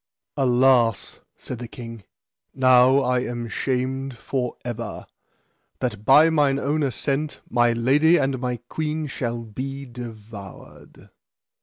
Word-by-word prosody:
Alas, 125 -4 +2 0.2
said 125 - -7
the 120 - -6
king, 115 -2 -9 0.5
now 130 +1 +5
I 125 -1 +1
am 120 -1 -4
shamed 130 +1 -2
for 125 +1 -3
ever, 115 -2 -5 0.7
that 110 -5 -4
by 155 +4 +7
mine 145 -3 +3
own 145 +3 0
assent 140 +2 -1
my 120 -1 +2
lady 145 +8 +4
and 135 -3 0
my 125 -1 -2
queen 155 +1 -3
shall 120 -4 -4
be 135 +5 -6
devoured. 110 -5 -11
125 Hz, 120 wpm, -23 LUFS, 120-135 Hz, 0.7 s, by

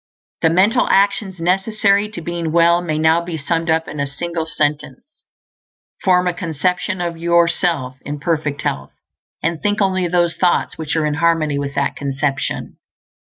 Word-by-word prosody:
The 160 - +4
mental 200 +9 +3
actions 200 -1 +2
necessary 200 +3 +1
to 210 -5 -7
being 170 -1 -3
well 170 +1 +4
may 155 -3 -2
now 160 +2 +3
be 170 -1 -5
summed 165 +2 -2
up 160 0 +1
in 150 - -7
a 140 - 0
single 165 +3 -4
sentence: 150 - -3 0.8
Form 180 -2 +3
a 180 - +1
conception 180 +3 -2
of 170 -1 -3
yourself 170 -5 +1
in 145 0 -5
perfect 150 -2 -2
health, 70 -1 -3 0.5
and 165 0 -1
think 205 0 0
only 185 -3 +1
those 175 -1 +1
thoughts 180 -1 +1
which 155 -1 -3
are 160 -1 +1
in 150 - 0
harmony 160 -4 +2
with 140 0 -4
that - - 0
conception. 135 0 -3
170 Hz, 160 wpm, -19 LUFS, 155-180 Hz, 0.8 s, The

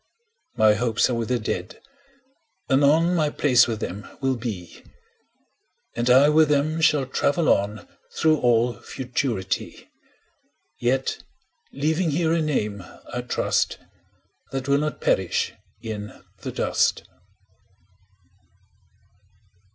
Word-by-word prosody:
My 110 -1 +5
hopes 115 +2 +1
are - - 0
with 115 -1 -2
the 125 - +2
Dead; 110 - -4 0.9
anon 150 +6 +4
My 155 -4 +2
place 130 -5 +4
with 115 -2 -4
them 100 +4 -5
will 135 -1 0
be, 105 -8 -6
20 - - -23 1.1
And 120 +1 0
I 130 +3 +7
with 155 0 +4
them 150 +3 +1
shall 145 -3 +3
travel 145 +5 0
on 100 +1 0 0.3
Through 155 -1 +3
all 120 0 +2
Futurity; 125 -6 -4 0.9
Yet 130 +2 0 0.5
leaving 160 +5 0
here 160 +2 +1
a 165 - +1
name, 105 - -2 0.3
I - - -2
trust, - - 0 0.7
That 135 -1 -4
will 140 0 +3
not 150 0 -3
perish - - 0 0.3
in 105 -2 -5 0.3
the - - -6
dust. - - 0
130 Hz, 115 wpm, -24 LUFS, 115-150 Hz, 1.1 s, I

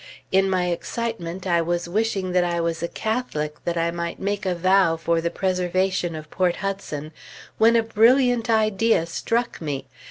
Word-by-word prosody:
In 195 0 +3
my 185 -1 +1
excitement, 185 -1 -4
I 170 -2 +2
was 170 +1 -1
wishing 195 -1 -1
that 180 0 +3
I 170 -1 -1
was 165 -1 -1
a 170 - -1
Catholic, 170 -10 -3
that 170 0 -1
I 165 0 +1
might 170 0 -4
make 200 0 -2
a 180 - +1
vow 185 -1 +3
for 165 +1 0
the 170 - 0
preservation 185 -1 0
of 155 -1 -9
Port 180 -2 +1
Hudson, 190 -7 -4 0.5
when 225 +1 +5
a 230 - +4
brilliant 235 +2 +3
idea 220 -4 +2
struck 230 +8 -2
me. 140 -4 -3
185 Hz, 170 wpm, -23 LUFS, 170-215 Hz, 0.5 s, when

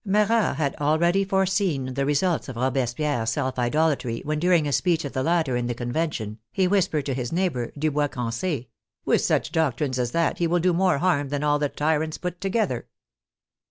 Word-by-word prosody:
Marat 210 -2 +2
had 140 -1 -1
already 170 +6 +2
foreseen 190 -8 0
the 135 +1 -1
results 155 +2 +1
of 130 - -6
Robespierre's 125 0 0
self 130 +2 -2
idol 155 +7 +2
atry, 115 -2 -5
when 150 0 -1
during 175 -2 +3
a - - -1
speech 165 +1 +1
of 140 - -5
the 130 - -1
latter 160 -4 +1
in 120 0 -1
the 120 - -2
Conven 140 +8 -1
tion, 110 -3 -6
he 190 -1 +1
whispered 180 -7 +1
to 135 - -1
his 125 -2 -3
neighbor, 165 -9 -1
Dubois 150 0 +1
Crance, 125 +3 -3
— - - -65
" - - -54
With - - +3
such - - 0
doctrines 140 -4 0
as 120 -1 0
that, 165 +6 0
he 170 - +2
will 175 +2 +2
do 180 +1 +2
more 180 -2 +2
harm 145 -4 +1
than 145 +1 -2
all 145 0 +2
the 145 -1 0
tyrants 155 +1 -1
put 180 -1 -5
together." 195 - -1
150 Hz, 205 wpm, -24 LUFS, 130-175 Hz, -, during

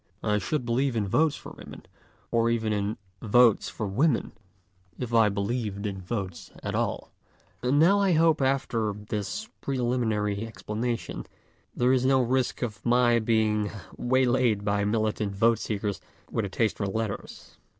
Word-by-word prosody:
I 105 -1 +2
should 125 +6 -2
believe 125 +2 +1
in 105 -3 0
votes 155 +9 +2
for - - -10
women, - - -11 0.5
or 115 0 +3
even 110 -2 0
in 105 +1 -1 0.2
Votes 115 +1 +4
for 110 - -4
Women, 125 +7 +1 0.7
if 120 -2 -5
I 110 -2 +5
believed 100 0 -2
in 95 -2 -4
votes 95 -2 -5
at - - -3
all. - - -2 0.5
And 125 +3 +2
now 180 +7 +5
I 195 -3 +3
hope 160 -1 +4
after 125 -5 0
this 105 - -4
preliminary 115 -6 0
explanation 115 +2 -4 0.5
there 125 +1 +3
is 130 -1 +2
no 130 0 +4
risk 130 +1 0
of 105 -5 -5
my 120 -1 +4
being 110 -2 +1 0.3
waylayed 125 -4 +2
by 100 0 +1
militant 105 -1 0
vote 115 +3 +3
seekers 105 -2 -3 0.3
with 110 - -1
a - - -4
taste 110 +3 0
for 100 - -1
letters. 110 +1 -5
115 Hz, 150 wpm, -27 LUFS, 105-125 Hz, 0.7 s, I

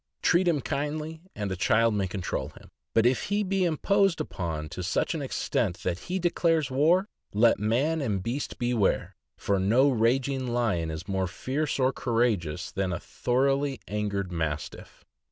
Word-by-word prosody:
Treat 180 +1 +4
him 155 -5 +2
kindly, 150 +4 -3
and 100 -2 -3
a - - -1
child 115 +4 +3
may 100 -2 0
control 90 -1 -3
him; - - -16 0.3
but 115 0 +4
if 125 0 +2
he 205 +1 0
be 195 -1 0
imposed 195 +2 +2
upon 80 - -3
to - - -6
such - - 0
an - - -3
extent 85 - -1
that 90 -1 -1
he 185 - 0
declares 165 -5 +1
war, 165 +9 +3 0.3
let 115 +1 +4
man 135 +10 +1
and 105 -8 -1
beast 130 +7 -3
beware, 120 -4 0 0.2
for 100 -1 0
no 120 +9 +4
raging 130 +2 +1
lion 110 -9 0
is 80 +3 -6
more 95 -2 0
fierce 140 - -2
or 130 0 +2
courageous 110 - 0
than 95 -3 -1
a 90 - -2
thor 125 +2 0
oughly 140 -1 0
angry 105 -1 -1
Mastiff. 80 -4 -5
120 Hz, 170 wpm, -27 LUFS, 100-150 Hz, 0.3 s, Treat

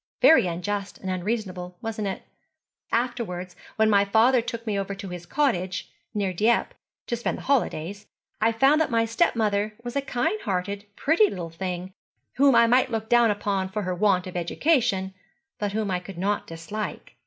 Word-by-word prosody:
Very 320 - +6
unjust 195 +4 -3
and 190 - -4
unreasonable, 185 -2 -3
wasn't 220 -2 -3
it? 190 - -4 0.7
Afterwards, 225 -7 -2 0.2
when 220 0 +3
my 200 -2 +5
father 225 +5 +4
took 230 0 -6
me 215 -2 -1
over 195 0 -3
to 195 -1 -7
his 175 -1 -8
cottage, 190 -9 0 0.2
near 195 -3 0
Dieppe, 220 +6 +2 0.3
to 235 - -1
spend 235 - -2
my - - -9
holidays, 205 - -1 0.3
I 225 +1 +4
found 270 +7 +4
that 315 - +1
my 230 -1 +2
stepmother 215 -5 +1
was 240 +1 -6
a 280 - +2
kind 275 - -1
hearted, 200 +1 -2
pretty 335 +8 +3
little 170 -3 -6
thing, 180 +1 -5 0.4
whom 275 -1 +5
I 235 0 +7
might 250 +3 +3
look 220 -1 -3
down 240 -1 +5
upon 200 -2 -1
for 210 +2 -3
her 185 0 -1
want 185 0 +2
of 185 - -8
education, 195 - +1 0.5
but 205 -1 -2
whom 215 -2 -1
I 180 - 0
could 180 0 -10
not 200 +3 -1
dislike. 165 +6 -6
205 Hz, 175 wpm, -25 LUFS, 185-235 Hz, 0.7 s, I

